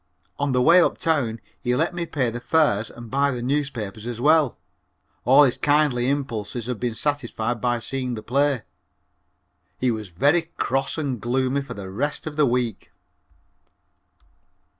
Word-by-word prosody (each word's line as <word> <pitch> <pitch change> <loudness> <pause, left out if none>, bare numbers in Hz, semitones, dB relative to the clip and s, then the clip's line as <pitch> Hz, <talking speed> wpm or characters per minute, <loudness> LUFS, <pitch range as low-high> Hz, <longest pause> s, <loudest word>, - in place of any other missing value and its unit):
On 140 -1 0
the 125 -1 +2
way 170 +5 +7
uptown 140 -10 0 0.2
he 125 0 0
let 165 +6 0
me 175 -1 -3
pay 135 -7 -1
the 120 - -5
fares 120 -7 +2
and 120 -1 -11
buy 140 +1 +2
the 125 -3 -3
newspapers 125 -6 -2
as 120 -1 -5
well. 150 0 +3 0.7
All 135 +4 +7
his 130 -4 +2
kindly 145 -4 +2
impulses 120 -5 -3
had 125 -3 -4
been 120 -2 -2
satisfied 120 -4 -2
by 120 -1 +1
seeing 125 +1 -3
the 110 - -7
play. 140 -1 +1 1.1
He 125 -1 +1
was 110 -2 -4
very 145 - +2
cross 135 +4 -1
and 135 -7 -2
gloomy 130 +3 0
for 140 - -8
the 95 -2 -7
rest 145 +9 -2
of 155 -2 -5
the 150 -2 +3
week. 120 -3 -2
130 Hz, 160 wpm, -23 LUFS, 120-145 Hz, 1.1 s, way